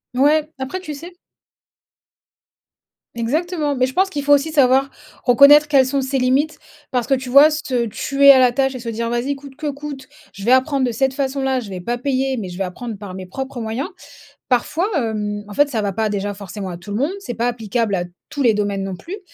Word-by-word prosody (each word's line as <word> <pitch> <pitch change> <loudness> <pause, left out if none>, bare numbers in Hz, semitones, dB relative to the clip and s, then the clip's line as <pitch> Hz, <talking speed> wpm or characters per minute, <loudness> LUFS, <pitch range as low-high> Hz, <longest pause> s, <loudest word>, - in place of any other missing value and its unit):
Ouais, 300 +3 +3
après 265 +8 -4
tu 310 -5 -7
sais 340 +5 -10 2.0
Exactement, 300 +5 -1
mais 255 0 +2
je 260 - -7
pense 385 +4 +1
qu'il 285 -2 -3
faut 290 - +5
aussi 285 +3 +2
savoir 270 -2 +4 0.4
reconnaître 280 +4 +7
quelles 270 -3 +4
sont 275 +1 0
ses 265 0 -1
limites 265 +5 +1 0.3
parce 245 -3 -1
que 270 - +3
tu 260 -1 -6
vois, 280 +4 +8
se 255 -6 -1
tuer 280 +5 +5
à 270 - +7
la 255 -1 +5
tâche 265 +1 0
et - - -5
se 235 - -9
dire: 230 +1 -3
«Vas-y 240 +4 -1
coûte 275 -1 -12
que 305 - -8
coûte, 280 -2 -8 0.2
je 195 0 -9
vais 240 - +3
apprendre 260 +1 +3
de 245 - -1
cette 265 +3 0
façon-là, 270 -1 -1
je 215 -5 -8
vais 185 -1 -6
pas 240 +6 -2
payer, 265 0 -1
mais 190 -5 -5
je 175 - -8
vais - - +1
apprendre 220 +5 -6
par 195 -3 -8
mes 190 0 -7
propres 265 +5 -6
moyens». 225 +5 -3 0.6
Parfois, 315 +9 +1
hem, 210 -4 -2
en 205 - -9
fait, 290 +6 +3
ça 230 -6 -1
va 200 -1 -1
pas 220 +2 0
déjà 205 0 -2
forcément 200 -1 -7
à 175 - -6
tout 175 +4 -10
le 205 - -2
monde, 285 +8 0
c'est 245 -12 -6
pas 235 +1 0
applicable 225 -2 -1
à 175 -1 -2 0.2
tous 290 - -4
les 235 -5 +4
domaines 205 -1 -1
non 195 -1 -4
plus 265 - -9
et 410 - -6
260 Hz, 230 wpm, -20 LUFS, 220-280 Hz, 2.0 s, vois